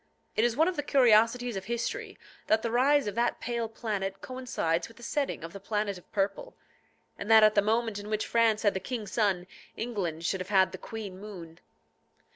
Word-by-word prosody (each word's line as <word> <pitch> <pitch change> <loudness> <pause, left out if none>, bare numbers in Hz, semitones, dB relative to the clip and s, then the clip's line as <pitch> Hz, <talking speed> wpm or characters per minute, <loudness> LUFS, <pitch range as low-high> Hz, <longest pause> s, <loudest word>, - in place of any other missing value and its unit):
It 220 - +2
is 240 -1 +2
one 320 +2 +4
of 370 - -1
the - - +1
curiosities 245 -3 +4
of 190 -1 -5
history, 235 +2 -3 0.3
that 220 0 +3
the 230 - -1
rise 275 +4 +4
of 205 - -3
that 235 +3 0
pale 235 -1 -2
planet 200 -4 -3
coincides 245 -10 -2
with 230 - -17
the 240 - -13
setting 280 - -2
of 165 +1 -7
the 200 - -7
planet 205 0 -2
of - - -25
purple, 195 -1 -2 0.6
and 205 - -5
that 220 -1 +8
at 215 0 +6
the 205 - +4
moment 220 0 0
in 205 +1 -8
which 215 0 -1
France 230 -2 +2
had 205 - +3
the 190 - -2
king 235 0 -4
Sun, 195 -4 0 0.3
England 180 -9 -3
should 190 +1 0
have 185 - -6
had 190 -2 +4
the 190 - -8
queen 205 -4 -7
Moon. 175 -6 -10
215 Hz, 210 wpm, -29 LUFS, 195-235 Hz, 0.6 s, that